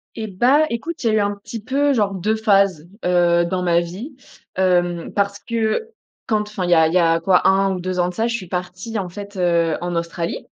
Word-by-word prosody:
Et 220 -1 -4
bah 255 +10 +3
écoute, 300 +8 -5
il - - +1
y - - +2
a - - +1
eu 215 - +3
un 205 0 0
petit 215 +2 -8
peu 280 +4 +1
genre 205 -4 +1
2 215 +4 0
phases, 195 -7 +2 0.2
heu, 175 -1 +3
dans 180 +1 -2
ma 170 -1 +3
vie. 195 - -7 0.4
Hem, 175 -2 +1
parce 200 0 0
que 230 - -2 0.4
quand 215 -1 +1
enfin 210 -3 -4
il 175 - -1
y - - +6
a 160 -1 +5
il 160 - -1
y - - +5
a 165 -1 +3
quoi 180 +1 +3
1 195 0 +3
ou 180 - -5
2 185 0 -3
ans 175 0 +2
de - - -11
ça, 225 +4 0
je 235 - -2
suis 210 -6 -4
partie 185 +5 -4
en 190 -3 -3
fait, 200 +2 -9
heu, 170 -3 +1
en 175 0 -3
Australie. 170 0 -3
190 Hz, 245 wpm, -20 LUFS, 175-220 Hz, 0.4 s, y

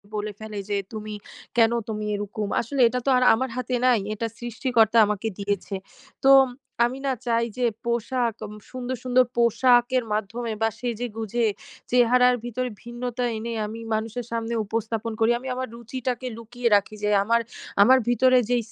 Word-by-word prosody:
বলে 210 0 -2
ফেলে 215 -2 -6
যে 205 - +1 0.2
তুমি 215 0 -6 0.4
কেনো 230 +1 +4
তুমি 215 -1 -3
এরোকম? 205 +1 -4
আসলে 260 +3 -2
এটা 250 +2 -1
তো - - +2
আর 250 - +3
আমার 260 +3 -1
হাতে 255 0 -1
নাই। 245 -4 +5
এটা 230 +2 -3
সৃষ্টিকর্তা 235 -2 +1
আমাকে 210 +1 -2
দিয়েছে। 200 0 -2 0.5
তো 270 - +5 0.6
আমি 255 +3 -3
না 265 - +2
চাই 235 -1 +2
যে, 250 - +1 0.2
পোশা্‌ 240 +1 0 0.5
সুন্দর, 255 0 -4
সুন্দর 255 0 +4
পোশাকের 240 +2 +4
মাধ্যমে 225 +3 -3
বা 225 - +3
সেজে 245 0 -3
গুঁজে 225 +1 -1 0.5
চেহারার 250 0 +5
ভিতরে 250 +1 -2
ভিন্নতা 240 +1 -4
এনে 230 +1 -4
আমি 220 +2 -6
মানুষের 225 +2 -3
সামনে 230 0 -2
উপস্থাপন 225 +1 -3
করি। 225 +1 +4
আমি 265 - -9
আমার 255 0 -3
রুচিটাকে 250 +1 -4
লুকিয়ে 235 +1 -3
রাখি। 205 +1 0
যে 210 - +2
আমার, 230 +2 +2 0.4
আমার 260 +5 +7
ভিতরে 255 +1 +4
যেই 240 -2 +2
235 Hz, 160 wpm, -24 LUFS, 220-250 Hz, 0.6 s, আমার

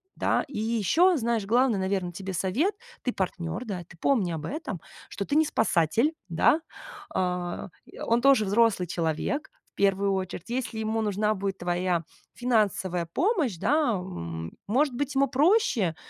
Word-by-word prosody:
да. - - +1
И 265 - -5
ещё, 235 - +3
знаешь, 230 -4 0
главный, 235 0 +3
наверно, 190 -1 -1
тебе 190 +2 -5
совет- 220 - +1 0.3
ты 250 - -1
партнёр, 185 +1 -3
да, 190 -6 -4
ты 175 0 -17
помни 205 -3 +1
об 160 -2 -4
этом, 280 - -4 0.3
что 200 - -4
ты 285 - -1
не 315 +1 +5
спасатель, 225 - +2 0.2
да. 175 - +3 0.5
А, 180 -1 -2 0.2
и - - -14
он 230 +1 +1
тоже 270 -5 +5
взрослый 205 -2 +3
человек, 170 - -2 0.2
в - - -66
1 195 0 +2
очередь. 185 +1 -4
Если 240 -2 -3
ему 220 +1 -1
нужна 210 0 +1
будет 195 -1 -3
твоя 175 -1 0 0.3
финансовая 205 -7 +1
помощь, 325 - +1
да, 295 - +2
м, 85 - -5
может 265 +6 +2
быть, 285 +2 -2
ему 275 +1 +4
проще 280 - +2
210 Hz, 155 wpm, -27 LUFS, 180-255 Hz, 0.5 s, не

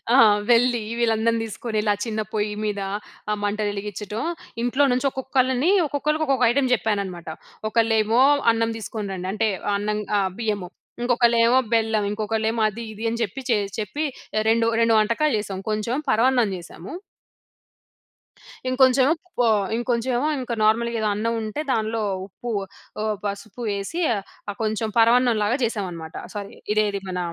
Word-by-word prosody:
ఆ! - - +7 0.3
వెళ్లి 240 0 +4 0.2
వీళ్ళందరిని 230 0 +2
తీసుకొనిలా 215 -1 -1
చిన్న 220 -2 -2
పొయ్యి 210 -1 -1
మీద, 205 -1 -1 0.5
ఆ - - +2
మంటలు 210 0 0
వెలిగించటం. 210 +1 -5 0.4
ఇంట్లో 260 +4 +2
నుంచి 255 +3 +1
ఒక్కొక్కళ్ళని, 260 +3 +1 0.2
ఒక్కొక్కళ్ళకి 300 +2 0
ఒక్కొక్క 265 -3 +3
ఐటెమ్ 260 0 +1
చెప్పాననమాట. 200 -6 -2 0.4
ఒకళ్ళేమో, 225 +1 +2 0.3
అన్నం 225 0 0
తీసుకొని 215 -2 -5
రండి. 185 0 -5
అంటే, 220 +1 +1 0.3
అన్నం 210 +1 -1 0.2
ఆహ్ 190 -1 +1
బియ్యము. 210 -6 -2 0.3
ఇంకొకళ్ళేమో 240 0 +4
బెల్లం, 220 -2 +2
ఇంకొకళ్ళేమో 220 +1 -1
అది 225 +3 -6
ఇది 220 - -7
అని 235 +1 -3
చెప్పి, 225 +5 -3
చేయి 205 -3 +1
చెప్పి 250 +9 -3 0.5
2,2 230 0 +3
వంటకాలు 235 +6 +1
చేసాం. 195 -2 -5
కొంచెం 215 +4 -1
పరమాన్నం 240 -1 +3
చేశాము. 170 +1 -10 1.8
ఇంకొంచెం 260 0 +4 0.3
పొ 245 - +4 0.3
ఇంకొంచెం 240 +1 -1
ఏమో 295 - +1
ఇంక 250 -2 -4
నార్మల్‌గా 230 +2 +2
ఏదో 215 - +1
అన్నం 230 +3 -1
ఉంటే 215 +6 -4
దానిలో, 220 0 0 0.2
ఉప్పు, 235 +5 -8 0.5
ఆహ్, 215 -1 0
పసుపు 200 +3 -5
వేసి 200 - -3 0.6
కొంచెం 220 +1 -1
పరమాన్నం 235 +1 +5
లాగా 235 +5 +2
చేశామన్నమాట. 180 -8 -4 0.2
సారీ, 200 -1 -6 0.2
ఇదేది 205 -2 +1
మన 180 - -3
225 Hz, 135 wpm, -23 LUFS, 210-240 Hz, 1.8 s, ఆ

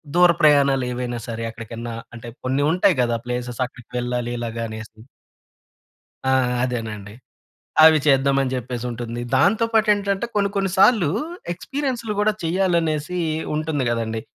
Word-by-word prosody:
దూర 175 0 +7
ప్రయాణాలు 140 -3 +4
ఏవైనా 120 -1 -3
సరే 115 -1 -4
ఎక్కడికన్నా 115 +1 -7 0.2
అంటే, 120 +1 -9 0.2
కొన్ని 130 +2 0
ఉంటాయి 180 -1 +3
గదా 120 -1 0
ప్లేసెస్, 125 0 -4
అక్కడికి 125 -1 -17
వెళ్ళాలి 120 0 -2
ఇలాగా 115 0 -4
అనేసి. 110 0 -9 1.3
ఆ! 130 - +2 0.3
అదేనండి. 110 -5 -4 0.7
అవి 160 0 +8
చేద్దామని 135 -1 +3
చెప్పేసుంటుంది. 120 -1 -4
దాంతో 220 - +3
పాటేంటంటే, 205 -1 +2
కొన్ని 200 -1 +2
కొన్ని 195 -1 +1
సాల్లూ 195 -5 +5 0.4
ఎక్స్‌పిరియన్స్‌లు 250 +2 -3
గూడా 210 +1 +3
చెయ్యాలనేసీ 170 -2 0 0.4
ఉంటుంది 155 -2 -1
గదండీ. 115 -1 -2
130 Hz, 120 wpm, -22 LUFS, 120-180 Hz, 1.3 s, అవి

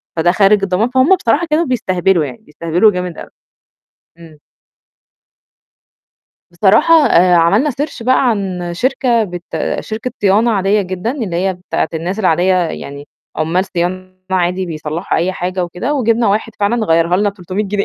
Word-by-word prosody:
فده 170 +2 +2
خارج 195 +1 +3
الضمان" 195 +5 0
فهم 260 +9 +4
بصراحة 335 +3 0
كانوا 315 +3 +1
بيستهبلوا 190 - 0
يعني، 125 -3 -8
بيستهبلوا 170 +7 +1
جامد 180 -3 -5
أوي. - - -9 0.9
إمم. 160 -2 -14 2.1
بصراحة 215 - +4
آآ 180 +1 +4
عملنا 200 - +3
search 280 -1 -5
بقى 255 +1 +2
عن 185 -4 -3
شركة 245 0 +1
بت 175 -2 -7 0.4
شركة 225 +3 -5
صيانة 205 +4 +3
عادية 200 0 +1
جدًا، 185 +3 -4
اللي 225 -11 -4
هي 190 +1 0
بتاعة 180 +1 -3
الناس 175 +6 -3
العادية 185 -1 +2
يعني 145 -5 -4 0.3
عُمّال 170 +4 0
صيانة 185 +1 -4 0.2
عادي 185 0 0
بيصلّحوا 155 +1 -3
أي 180 +3 0
حاجة 180 0 -3
وكده، 180 +12 -3
وجِبنا 230 -4 +1
واحد 215 +2 -1
فعلًا 220 +2 +1
غيّرها 165 +2 +2
لنا 205 +2 +1
ب300 195 +1 -4
جنيه. 200 0 -1
190 Hz, 150 wpm, -15 LUFS, 175-225 Hz, 2.1 s, فهم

